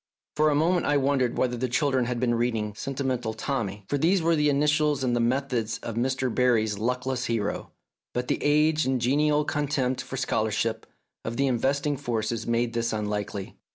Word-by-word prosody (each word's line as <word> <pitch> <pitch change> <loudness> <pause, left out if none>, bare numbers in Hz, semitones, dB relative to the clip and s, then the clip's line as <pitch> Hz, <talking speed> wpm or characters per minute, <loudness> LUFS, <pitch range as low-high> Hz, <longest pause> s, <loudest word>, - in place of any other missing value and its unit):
For 155 0 +4
a 145 - +2
moment 170 +4 +2
I 145 - +3
wondered 135 -3 +1
whether 125 -1 +1
the 125 +1 -2
children 130 0 +1
had 120 0 -2
been 120 -1 +1
reading 115 -3 -1
"Sentimental 130 -2 -3
Tommy," 110 -5 -3
for 145 - -1
these 180 +6 +3
were 165 0 +2
the 150 -1 +2
initials 150 0 +2
and 120 -2 +1
the - - +1
methods 120 -2 0
of 115 - -4
Mr. 130 +1 -1
Barrie's 110 -5 +2
luckless 125 +2 -1
hero, 115 -3 -2 0.4
but 125 0 -3
the - - -1
age 150 +1 +3
and 130 -1 +1
genial 150 +4 +2
contempt 135 -3 -1
for 130 +1 -7
scholar 110 -4 0
ship 110 +1 -2 0.4
of 115 +1 -4
the 140 - +2
investing 140 +3 0
forces 115 -4 -2
made 115 0 0
this 115 0 -1
unlikely. 105 -2 -3
125 Hz, 185 wpm, -26 LUFS, 115-145 Hz, 0.4 s, For